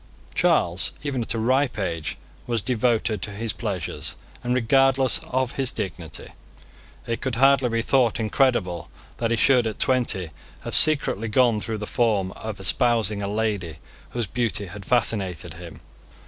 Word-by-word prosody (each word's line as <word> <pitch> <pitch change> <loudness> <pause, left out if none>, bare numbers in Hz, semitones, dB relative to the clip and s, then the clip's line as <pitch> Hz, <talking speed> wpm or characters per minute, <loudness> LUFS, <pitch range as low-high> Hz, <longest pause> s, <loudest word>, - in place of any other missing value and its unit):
Charles, - - +2
even 140 -4 -2
at 115 0 -2
a - - -1
ripe 130 +3 +1
age, 85 -6 -3 0.3
was 120 -1 0
devoted 115 -4 +1
to - - -4
his 105 +2 -3
pleasures 100 -7 -3 0.3
and 125 0 0
regardless 135 +3 +3
of 130 -4 -2
his 135 -2 +2
dignity. 90 -8 -5 0.8
It 115 -1 -3
could 130 -2 -2
hardly 135 0 +4
be 115 0 0
thought 125 -3 +2
incredible 105 - +1 0.3
that 115 - -1
he 115 - +1
should 125 -1 +4
at 110 - -4
twenty 115 -10 0 0.3
have - - -6
secretly 145 -8 +3
gone 115 -1 +3
through 110 0 -3
the 105 - -5
form 105 -5 +1
of 110 0 -7
espousing 110 0 +1
a 100 - -2
lady 100 -6 -2 0.3
whose 120 -2 -2
beauty 105 -1 -1
had 100 +2 -10
fascinated 100 - 0
him. - - -11
115 Hz, 155 wpm, -24 LUFS, 100-125 Hz, 0.8 s, hardly